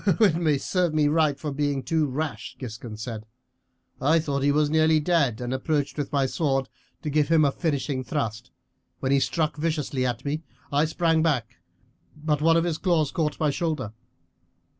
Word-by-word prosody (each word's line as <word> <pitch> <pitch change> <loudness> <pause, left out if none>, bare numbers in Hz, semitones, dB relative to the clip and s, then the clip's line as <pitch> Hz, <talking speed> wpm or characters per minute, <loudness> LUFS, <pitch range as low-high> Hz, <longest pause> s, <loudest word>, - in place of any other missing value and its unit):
"It 170 -7 +3
served 180 -4 0
me 150 -1 +3
right 155 -2 +2
for 150 - -3
being 140 -1 -1
too 160 -2 +1
rash," 135 -4 -4
Giscon 115 -3 -7
said. 110 -1 -6 0.7
"I 155 +5 +4
thought 145 -4 -1
he 140 +1 +3
was 150 +1 +3
nearly 160 0 +4
dead, 150 -8 +1
and 125 +1 -3
approached 145 +2 -1
with 145 -2 -3
my 140 -2 +2
sword 135 -1 0 0.3
to 150 - -2
give 150 0 +2
him 160 -2 +4
a 140 - +3
finishing 140 -4 -2
thrust. 110 -3 -3 0.5
When 130 - -1
he 140 - +5
struck 155 +2 0
viciously 150 -4 -1
at 125 +1 -2
me 150 +2 -1 0.3
I 145 +2 +4
sprang 165 0 +1
back, 150 -8 0 0.6
but 150 -1 -1
one 165 +1 +5
of 165 - +2
his 170 -3 -1
claws 165 -6 +1
caught 155 -4 -1
my 150 -2 +2
shoulder. 155 - -2
150 Hz, 180 wpm, -25 LUFS, 135-160 Hz, 0.7 s, he